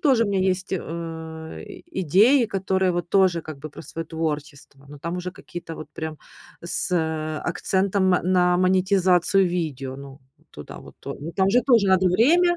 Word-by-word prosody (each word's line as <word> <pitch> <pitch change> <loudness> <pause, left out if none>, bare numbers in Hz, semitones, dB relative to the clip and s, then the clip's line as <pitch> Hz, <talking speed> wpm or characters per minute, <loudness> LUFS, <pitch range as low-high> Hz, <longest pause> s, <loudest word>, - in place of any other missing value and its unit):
тоже 260 -7 +3
у - - -2
меня 195 -1 +1
есть, 185 0 -1
э, 160 -2 -6
и - - -8
идеи, 220 - +4
которые 190 -2 0
вот 175 0 -3
тоже 185 -4 +3
как 155 -3 -8
бы 155 +2 -7
про - - -11
своё 165 0 -6
творчество, 150 -3 -5
но 145 0 -11
там 170 +5 -4
уже 180 0 -4
какие-то 175 -2 -9
вот 155 - -8
прям 155 -1 -6 0.5
с, 170 - 0
э, 160 -2 -1
акцентом 190 0 +1
на 180 0 +3
монетизацию 185 0 +3
видео, 145 -7 -3
ну, 140 0 -11 0.3
туда - - -10
вот - - -14
то - - -6
но 155 +3 -5
там 190 +2 +1
же 245 +5 +3
тоже 235 -6 +4
надо 190 -1 +4
время 340 - +4
180 Hz, 175 wpm, -23 LUFS, 160-190 Hz, 0.5 s, идеи